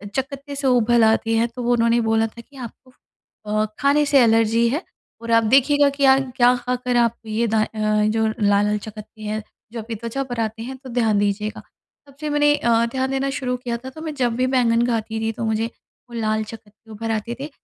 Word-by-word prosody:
चकत्ते 275 +1 -4
से 275 -1 -1
उभल 240 -2 +3
आते 225 +1 +2
हैं। 230 +1 +2
तो 240 +1 -8
वो 240 +1 +2
उन्होंने 235 0 +3
बोला 225 0 +1
था 235 +2 -12
कि, 280 +4 -23
"आपको 255 +1 -10 0.5
अ, 215 0 0
खाने 285 +3 +3
से 280 -1 +4
एलर्जी 225 0 +3
है 295 +9 -2 0.4
और 230 0 -5
आप 230 0 +5
देखिएगा 280 +5 +4
कि 280 0 0
आ 265 0 +6
क्या 250 -2 +2
खाकर 250 0 -2
आप 235 -1 +2
ये 220 +2 -1
दा 220 0 +1
अ, - - -3
जो 215 +1 +1
लाल-लाल 210 -1 +1
चकत्ते 215 +1 -11
हैं 215 0 -4 0.3
जो 235 - -6
अभी 225 +1 -6
त्वचा 235 +5 -4
पर 245 -1 -4
आते 225 0 -2
हैं 260 +2 -7
तो 260 0 -12
ध्यान 225 -4 +1
दीजिएगा।" 205 +1 -2 0.5
तब 280 - -18
से 305 0 -3
मैंने 295 0 +3
अ, 235 -3 +2
ध्यान 265 +1 -1
देना 270 0 -1
शुरू 250 -2 -2
किया 240 -1 -4
था, 260 +3 -9
तो 315 +4 -11
मैं 315 -1 -4
जब 245 -4 0
भी 255 +1 +1
बैंगन 235 -1 +3
खाती 225 -2 -2
थी 225 0 -1
तो 225 +1 -5
मुझे 220 +1 0 0.4
वो - - -13
लाल 215 0 0
चकत्ते 220 0 -13
उभर 225 +1 -4
आते 225 +2 -3
थे। 285 +2 -5
235 Hz, 220 wpm, -21 LUFS, 220-260 Hz, 0.5 s, आ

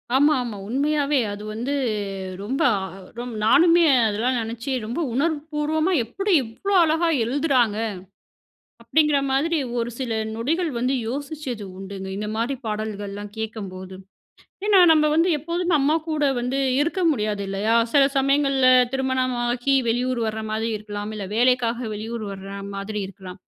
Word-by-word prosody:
ஆமா, 290 +3 +5
ஆமா. 220 -4 -6
உண்மையாவே 285 +2 +1
அது 205 +1 -8
வந்து 245 +6 -3 0.7
ரொம்ப 260 +6 -2 0.6
அ 245 - -4 0.2
நானுமே 340 +5 +5 0.2
அதெல்லாம் 235 +5 0
நெனச்சு, 230 +4 -4
"ரொம்ப 240 +9 -4
உணர்வு 300 +4 +1
பூர்வமா 310 +3 0
எப்படி 390 - -2
இவ்ளோ 320 - -4
அழகா 325 +2 +2 0.2
எழுதுறாங்க?" 255 -4 +1 1.1
அப்படிங்கிற 300 -2 +3
மாதிரி 315 +4 +1 0.2
ஒரு 235 0 -1
சில 250 -4 -3 0.2
நொடிகள் 315 +9 -1
வந்து 255 +3 0
யோசிச்சது 275 -4 -5
உண்டுங்க. 190 0 -7
இந்த 210 +1 -4
மாரி 235 +5 -1
பாடல்கள்லாம் 205 -1 -4
கேட்கம்போது. 190 -4 -6 0.7
ஏன்னா, 410 -3 +5
நம்ம 310 -1 +4
வந்து 330 +4 +3
எப்போதுமே 340 +3 -1
அம்மா 295 +3 +2
கூட 305 -2 0
வந்து 250 +3 -1 0.2
இருக்க 335 +5 -1
முடியாது 210 -7 -1
இல்லையா? 200 +4 0 0.2
சில 285 -2 +5
சமயங்கள்ல 275 -1 +3 0.2
திருமணமாகி 255 -1 0
வெளியூர் 245 +1 0
வர்ற 220 0 -3
மாதிரி 220 +1 -1
இருக்கலாம். 210 0 -6
இல்ல 205 -2 -5
வேலைக்காக 245 -1 +2
வெளியூர் 220 +2 -5
வர்ற 195 0 -8 0.2
மாதிரி 205 +2 -4
இருக்கலாம். 190 0 -11
250 Hz, 135 wpm, -23 LUFS, 215-295 Hz, 1.1 s, ஆமா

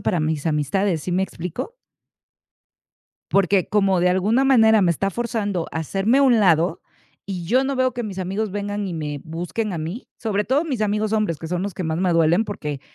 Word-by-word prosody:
para 175 - 0
mis 155 0 -1
amistades, 160 +3 0
¿sí 185 - -4
me 185 - +2
explico? 180 - -6 1.6
Porque 195 -1 +3
como 195 -3 +2
de 180 - +4
alguna 205 +8 +2
manera 220 -5 +5
me 175 -3 +4
está 195 +4 -1
forzando 205 -5 -2
a - - -4
hacerme 195 - +1
a - - +4
un 250 -5 +5
lado, 170 -2 +3 0.4
y 185 -3 -5
yo 255 +9 +3
no 275 0 -1
veo 255 -1 +2
que 240 0 -4
mis 195 -3 -5
amigos 195 +3 -2
vengan 205 0 -3
y 180 - -4
me 150 -3 -4
busquen 175 +7 -4
a - - -3
mí, 165 +10 -6
sobre 210 -3 -1
todo 275 +9 +1
mis 260 -8 -2
amigos 210 +1 0
hombres, 210 -8 0
que 165 - -6
son 175 +1 -2
los 200 -1 -4
que 185 - -5
más 160 -1 -1
me 185 -1 +2
duelen 165 +4 +3
porque 150 -9 -5
195 Hz, 210 wpm, -22 LUFS, 170-220 Hz, 1.6 s, manera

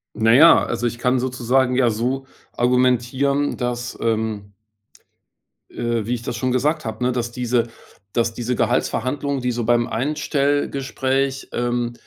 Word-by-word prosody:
Na 110 +1 +3
ja, 160 +6 +7
also, 120 0 -1
ich 120 - -4
kann 125 +1 +2
sozusagen 125 0 +1
ja 125 -2 +3
so 125 +5 -2 0.3
argumentieren, 125 +3 +1
dass, 120 -1 -3
ähm 110 -3 -2 1.2
äh, 115 -2 -2
wie 120 - -1
ich 120 - -3
das 120 - -4
schon 130 +1 -1
gesagt 140 +5 0
habe, 110 +2 -4
ne? 125 - +2
Dass 120 -1 -2
diese 120 -1 0 0.5
dass 115 -1 +1
diese 120 +2 -2
Gehaltsverhandlungen, 130 +4 -1
die 125 0 0
so 120 0 -2
beim 120 0 +3
Einstellgespräch, 135 0 -1
ähm, 120 0 -1
125 Hz, 145 wpm, -21 LUFS, 120-130 Hz, 1.2 s, ja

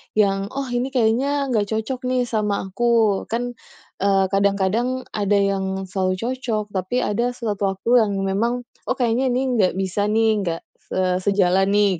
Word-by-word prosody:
yang, 195 -2 +2
"Oh, 270 -3 -3
ini 245 +2 0
kayaknya 265 +3 +1
nggak 210 -4 +1
cocok 250 +4 -3
nih, 255 -1 +1
sama 210 -4 -1
aku." 215 +1 +1
Kan, 245 +1 -3 0.4
eee, 195 0 +3
kadang-kadang, 200 +6 +1
ada 205 -1 +1
yang 195 -1 0
selalu 185 -1 -1
cocok, 225 -1 -3
tapi 190 +7 -1
ada 240 +4 -1
suatu 210 -4 -2
waktu 235 +6 +3
yang 200 - -2
memang, 230 +6 0 0.2
"Oh, - - +1
kayaknya 245 +1 +1
ini 250 +1 +1 0.2
nggak 185 - +3
bisa 195 +2 -1
nih, 220 +1 +3 0.2
nggak," 165 0 -2 0.3
eee, 185 -1 +1
"sejalan, 195 -1 +2
nih," 200 -4 +3
210 Hz, 160 wpm, -22 LUFS, 195-245 Hz, 0.4 s, eee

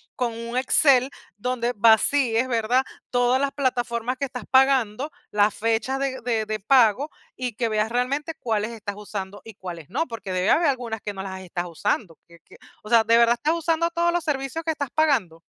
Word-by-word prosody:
Con 245 -2 -1
un 230 +2 -5
Excel, 260 0 +4 0.3
donde 245 +2 -2
vacíes, 230 +3 +3
¿verdad? 245 +2 +1 0.3
Todas 245 +1 +2
las 280 -1 0
plataformas 245 -3 -1
que 280 - -4
estás 250 -2 -7
pagando, 265 0 +3 0.2
las 205 0 +3
fechas 230 +4 -1
de 270 -1 -2
de 225 -2 -1
de 215 0 -3
pago 255 +4 +4 0.3
y 250 -3 -4
que 235 +1 0
veas 215 0 0
realmente 275 +6 -1
cuáles 220 -1 -1
estás 210 -3 -6
usando 205 -1 -7
y 225 -2 -12
cuáles 170 -6 -8
no, 325 - -1
porque 225 -5 -7
debe 185 +2 0
haber 335 - +4
algunas 240 -5 -2
que 205 - -5
no 190 - -6
las 190 -1 -6
estás 180 -1 -4
usando, 170 +1 -2
que 170 - -17
que, - - -19 0.3
o 215 - -10
sea, 230 -1 +5
¿de 230 +1 +4
verdad 235 0 +5
estás 310 +6 0
usando 335 0 0
todos 340 0 +1
los 350 -2 0
servicios 295 +1 -3
que 320 - 0
estás 285 -4 -4
pagando? 260 - +2
240 Hz, 200 wpm, -24 LUFS, 215-270 Hz, 0.3 s, sea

